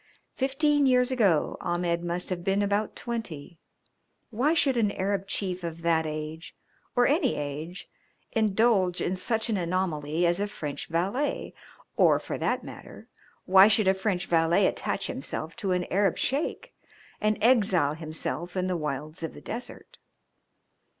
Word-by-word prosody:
Fifteen 280 +2 +2
years 250 0 +3
ago 200 -11 +2
Ahmed 175 0 -1
must 175 +2 -2
have 175 -1 -3
been 195 +2 +1
about 205 +1 0
twenty. 175 -9 -6 0.7
Why 265 +9 +2
should 280 -5 +3
an 220 -4 +2
Arab 195 0 -1
chief 185 -2 -3
of 165 0 -6
that 165 -1 +2
age, 155 +1 -6 0.4
or 245 - +4
any 305 +6 +2
age, 150 +5 -5 0.4
indulge 215 -4 +2
in 185 - -1
such 220 +4 -1
an 220 -3 0
anomaly 170 -3 -1
as 175 +2 +2
a 205 - 0
French 150 -8 -6
valet, 195 - -1 0.4
or - - +5
for - - -5
that - - 0
matter - - -11 0.4
why 190 +2 +8
should 215 -2 +3
a 190 - +6
French 190 -2 -1
valet 170 +3 +3
attach 200 0 -1
himself 155 +4 -5
to 200 -5 -2
an 180 0 +1
Arab 195 -1 +2
Sheik 280 +5 -2 0.5
and 215 0 +2
exile 200 - +3
himself 160 +3 -5
in 185 - +1
the 185 -1 -1
wilds 150 +1 -4
of 165 - -5
the - - -9
desert? 240 +2 -8
185 Hz, 150 wpm, -27 LUFS, 165-220 Hz, 0.7 s, why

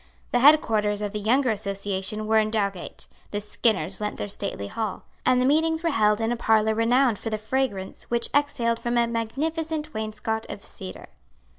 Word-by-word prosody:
The 245 - +3
headquarters 215 -7 +4
of 205 - -2
the 210 - -3
younger 245 +4 +2
association 200 0 -3
were 220 +1 +4
in 215 0 +1
Dowgate; 200 -4 -3 0.2
the 205 - -2
Skinners 205 -3 -1
lent 210 0 -3
their - - -3
stately 200 - -4
hall; 215 - -4 0.2
and 255 -1 +5
the 250 - +2
meetings 320 +3 +2
were 335 - +2
held 210 -4 +3
in 225 +1 0
a - - +1
parlour 220 -2 +3
renowned 235 +1 +3
for 225 - -4
the 215 - -1
fragrance 215 -4 -2
which 235 0 +1
exhaled 235 -5 +1
from 240 0 -1
a 235 - +4
magnificent 305 +7 -2
wainscot 220 +1 -3
of 200 - -7
cedar. 190 -1 -8
220 Hz, 180 wpm, -25 LUFS, 210-250 Hz, 0.2 s, and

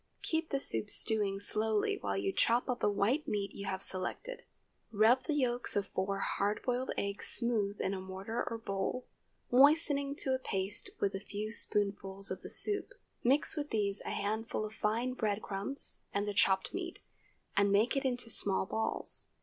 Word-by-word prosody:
Keep 320 0 -2
the 275 - -2
soup 110 - +6
stewing 205 -3 +7
slowly 215 +1 -1
while 100 -1 -3
you 100 - -2
chop 235 +2 +1
up 250 -1 -3
the - - +1
white 230 +10 -1
meat 200 -5 -3
you 200 - -8
have 190 0 -1
selected. 190 - +4 0.5
Rub 230 +4 +3
the 305 - -2
yolks 250 -3 0
of 200 - 0
four 195 +1 -3
hard 205 +1 -2
boiled 250 +1 -2
eggs 200 +1 -3
smooth 215 -4 +2
in 190 - -2
a 190 - -5
mortar 190 +5 -5
or 230 - -5
bowl, 220 +3 -4 0.5
moistening 280 +1 +3
to 265 -2 0
a 260 - -1
paste 195 -5 -3
with 200 - -1
a 195 - -4
few 210 +2 -7
spoonfuls 200 -3 0
of 185 - -6
the - - -10
soup. 420 +4 +2 0.3
Mix 270 +4 +1
with 295 -1 -5
these 200 -2 -2
a - - -7
handful 215 +1 -3
of 215 - -9
fine 230 +4 -2
bread 215 -4 -3
crumbs 200 +8 -1
and 200 +1 -3
the 205 - -3
chopped 190 -1 +1
meat, 360 -2 -6 0.6
and 200 0 +2
make 215 +6 +2
it 275 - -1
into 245 -3 -2
small 195 -2 0
balls. 220 +3 -2
215 Hz, 180 wpm, -31 LUFS, 200-255 Hz, 0.6 s, stewing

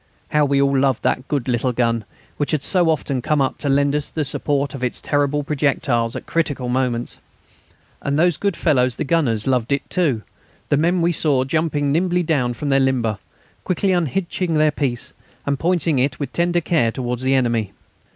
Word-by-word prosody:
How 150 -1 +3
we 140 0 +2
all 140 0 +2
loved 135 -2 +1
that 130 - 0
good 140 -5 -2
little 125 0 0
gun, 115 -2 0 0.3
which 145 - -1
had 150 -3 0
so 180 -3 +3
often 140 -4 -1
come 150 +3 +1
up 135 - 0
to 145 - -1
lend 140 +1 +2
us 150 -1 -2
the 155 -2 -2
support 140 0 -1
of 135 -2 -6
its 125 - -1
terrible 145 0 0
projectiles 135 -5 0
at - - -6
critical 145 -6 -1
moments! 125 -2 -1 0.8
And 140 +1 -1
those 175 +1 +3
good 200 -3 -1
fellows 125 -7 +2
the - - -2
gunners 135 -9 0
loved 125 -2 0
it 140 0 0
too; 145 - +1 0.5
the - - +3
men 170 +4 +2
we 170 - +3
saw 145 -5 +2
jumping 145 0 0
nimbly 175 +3 +1
down 130 -7 0
from 145 +5 -3
their 135 0 +4
limber, 120 -6 0 0.4
quickly 190 +2 0
unhitching 175 0 -1
their 155 0 +4
piece, 130 -5 -2 0.3
and 140 -1 -1
pointing 165 -5 +1
it 130 0 0
with 140 -4 -4
tender 175 0 +1
care 155 -9 +1
towards 125 0 -3
the 130 +1 +2
enemy. 120 -5 +1
140 Hz, 190 wpm, -20 LUFS, 125-155 Hz, 0.8 s, their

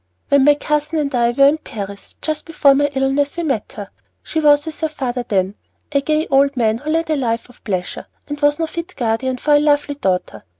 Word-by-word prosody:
"When 280 -1 +4
my 295 0 +6
cousin 300 +2 -1
and 290 -2 -1
I 235 -1 +2
were 275 +3 +4
in 305 +2 +2
Paris, 200 -6 -8
just 310 -1 -3
before 290 -4 +4
my 285 +1 +2
illness, 270 +3 0
we 340 - -1
met 270 -9 -2
her. 205 -1 -8 0.3
She 320 - -2
was 295 -1 +4
with 320 -1 -6
her 315 - -1
father 255 -5 -3
then, 195 -3 0 0.4
a 280 -1 +2
gay 310 +2 0
old 275 0 +3
man 225 -1 +1
who 295 +4 -6
led 325 0 0
a - - +2
life 235 -4 -2
of 245 - -20
pleasure, 185 -4 -4 0.2
and 290 0 -6
was 290 0 +3
no 330 - 0
fit 335 +3 -7
guardian 250 +2 -1
for 295 +4 +1
a 290 - +6
lovely 290 -1 +2
daughter. 190 -10 -2
280 Hz, 225 wpm, -19 LUFS, 240-300 Hz, 0.4 s, my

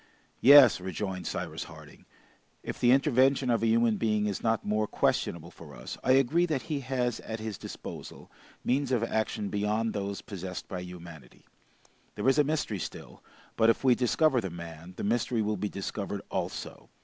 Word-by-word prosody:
"Yes," 135 -7 +8
rejoined 95 0 -4
Cyrus - - -4
Harding, - - -14 0.6
"if - - -6
the 120 - +4
intervention 135 -1 +3
of 115 - +1
a 115 - +2
human 115 -1 +3
being 105 -1 +1
is 100 -2 -2
not 115 -1 0
more 105 +1 0
questionable - - -1
for - - -13
us, - - -7
I 130 - +4
agree 140 +7 +3
that 150 -6 -1
he 150 -3 -3
has 125 -2 -1
at 110 0 -6
his 110 -1 -4
disposal - - -9 0.3
means 135 +1 0
of 120 -3 +1
action 110 -2 -1
beyond 105 +2 0
those 100 -1 -3
possessed 95 -2 -7
by 90 - -5
humanity. 85 -7 -11 0.7
There 105 - -2
is 135 +2 +4
a - - +6
mystery 145 -9 -1
still, - - -8 0.3
but 115 0 +4
if 115 - +2
we 130 -2 +6
discover 130 +2 +2
the 95 - -4
man, 85 +1 -9
the - - -4
mystery 115 +1 0
will 105 0 0
be 105 +2 -2
discovered 100 0 -5
also. - - -5
110 Hz, 175 wpm, -29 LUFS, 100-130 Hz, 0.7 s, Yes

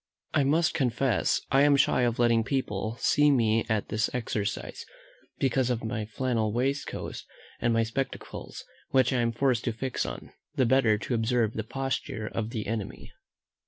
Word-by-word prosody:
I 150 - +3
must 160 +4 +2
confess 130 -2 +1
I 135 - +5
am 145 0 +5
shy 135 - +3
of 120 -1 +1
letting 115 -1 +3
people 110 -4 -2
see 150 0 +4
me 115 -5 +2
at 110 -2 0
this 110 +1 0
exercise, 110 -3 -3 0.5
because 130 -1 +1
of 120 -2 -1
my 110 -1 -3
flannel 115 -2 -1
waistcoat, 135 +5 -2 0.4
and 120 - +1
my 115 0 +3
spectacles, 130 +4 -5 0.3
which 130 0 +3
I 125 - +2
am 115 0 +1
forced 125 0 +1
to 120 - +1
fix 125 +3 -3
on, - - -7 0.2
the 130 - +3
better 115 -4 +4
to 115 - -4
observe 115 -1 +1
the 110 - -3
posture 135 -2 -3
of 110 0 -3
the 110 -2 -4
enemy. 110 -2 -5
120 Hz, 165 wpm, -28 LUFS, 110-135 Hz, 0.5 s, I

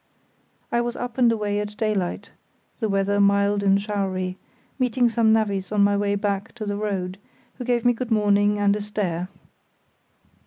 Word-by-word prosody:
I 235 - +2
was 240 0 -3
up 245 +1 -5
and 240 -2 +5
away 210 -2 -1
at 210 0 -5
daylight 210 -5 -2 0.5
(the 220 -3 -1
weather 200 +1 +1
mild 200 0 +3
and 195 0 +3
showery), 190 -3 -2 0.4
meeting 250 -1 +2
some 225 -1 +3
navvies 200 -4 0
on 210 -1 +3
my 205 0 +3
way 200 0 +1
back 200 0 -2
to 220 -3 -5
the 205 0 -2
road, 195 -3 -3 0.4
who - - -3
gave 240 -1 0
me 245 - +5
good 240 +1 -5
morning 205 -1 +3
and 205 0 +2
a 210 - -3
stare. 185 -4 -3
205 Hz, 170 wpm, -23 LUFS, 200-220 Hz, 0.5 s, and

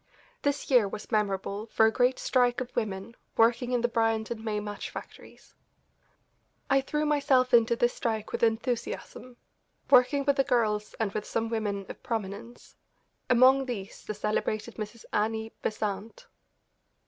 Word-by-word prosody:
This 285 0 -1
year 240 -6 +5
was 200 - -8
memorable 205 0 -1
for 220 - +3
a 220 - +4
great 250 +2 +2
strike 245 -2 +2
of 255 -1 -6
women 205 +2 -3 0.2
working 240 +2 +3
in 245 -1 +1
the 240 - +2
Bryant 225 -1 0
and 225 -2 -5
May 215 -2 -1
match 205 -1 -6
factories. - - -11 1.2
I 270 0 +5
threw 300 +3 -1
myself 270 -4 +2
into 235 0 +5
this 240 +1 +2
strike 220 -2 -3
with - - -3
enthusiasm, 240 +1 -2 0.5
working 275 +3 +5
with 280 -1 +2
the 270 - +4
girls 220 -5 0
and 220 -3 0
with 210 +1 -4
some 230 0 -2
women 205 -3 -2
of - - -9
prominence, 225 +1 -6 0.5
among 260 +2 +5
these 205 -5 -6
the 215 - -5
celebrated 215 +2 -2
Mrs. 215 +1 -7
Annie 220 +1 -1
Besant. 215 - -4
230 Hz, 150 wpm, -28 LUFS, 215-250 Hz, 1.2 s, year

